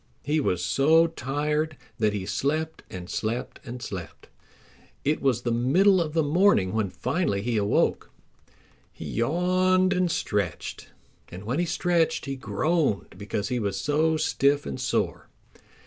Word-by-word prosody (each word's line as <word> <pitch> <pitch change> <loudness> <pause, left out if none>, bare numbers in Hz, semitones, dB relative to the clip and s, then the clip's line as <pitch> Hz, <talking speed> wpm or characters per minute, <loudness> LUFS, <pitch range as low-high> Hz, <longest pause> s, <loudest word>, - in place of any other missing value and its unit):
He 150 +2 +1
was 90 - 0
so 160 +4 +4
tired 150 0 -2 0.2
that 110 -1 +3
he 100 -2 -3
slept 155 +10 -1
and 90 -1 -7
slept 115 +6 -3
and 120 0 -7
slept. 90 -6 -8 0.8
It 150 +2 +1
was 125 -3 +1
the 120 - 0
middle 175 - +4
of 155 -2 -3
the 160 -1 +2
morning 145 - +3
when 110 -3 0
finally 125 - -1
he 120 0 -1
awoke. 105 -1 +1 0.8
He - - -9
yawned 185 - +2
and 180 -1 +1
stretched, 105 - -2 0.4
and 90 +3 -9
when 125 +8 -2
he 175 - +2
stretched 170 -1 +1
he 135 -1 -3
groaned 135 - -1
because 100 +2 -3
he 125 -1 0
was 100 -3 -2
so 155 +6 +1
stiff 145 -2 +2
and 70 - -5
sore. - - -1
140 Hz, 145 wpm, -26 LUFS, 105-160 Hz, 0.8 s, so